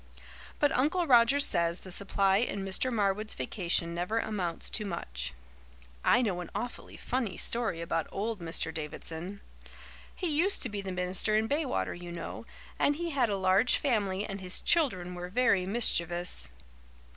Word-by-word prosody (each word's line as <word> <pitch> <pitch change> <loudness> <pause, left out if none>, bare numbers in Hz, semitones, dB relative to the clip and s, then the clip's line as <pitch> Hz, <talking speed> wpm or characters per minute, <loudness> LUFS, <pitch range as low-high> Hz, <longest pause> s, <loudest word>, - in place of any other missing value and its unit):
But 290 - +3
Uncle 315 +8 +2
Roger 250 0 +5
says 170 -9 +1
the 185 - -10
supply 195 0 +2
in 200 -3 -1
Mr. 195 +7 0
Marwood's 210 -1 0
vacation 170 - -1
never 180 +6 -2
amounts 190 -7 -2
to 215 - -1
much. 60 - -4 0.7
I 245 +2 +4
know 185 -6 -1
an 175 - -7
awfully 245 - -5
funny 240 -6 -2
story 230 -8 -1
about 165 -1 -1
old 215 +2 -3
Mr. 165 -1 -1
Davidson. 160 +5 -6 0.7
He 335 -5 -2
used 370 +6 +2
to 250 - +2
be 205 -1 -4
the 195 -1 -5
minister 180 +4 +2
in 220 +1 +1
Baywater, 285 +1 -1
you 175 0 -8
know, 170 - -7 0.3
and 290 - +3
he 340 +2 -3
had 260 -5 +2
a 200 - 0
large 190 +5 +4
family 205 -7 0
and 195 -1 -6
his 180 -1 +1
children 190 - +2
were 180 0 -6
very 200 -4 +2
mischievous. 175 - +2
195 Hz, 160 wpm, -30 LUFS, 175-240 Hz, 0.7 s, Roger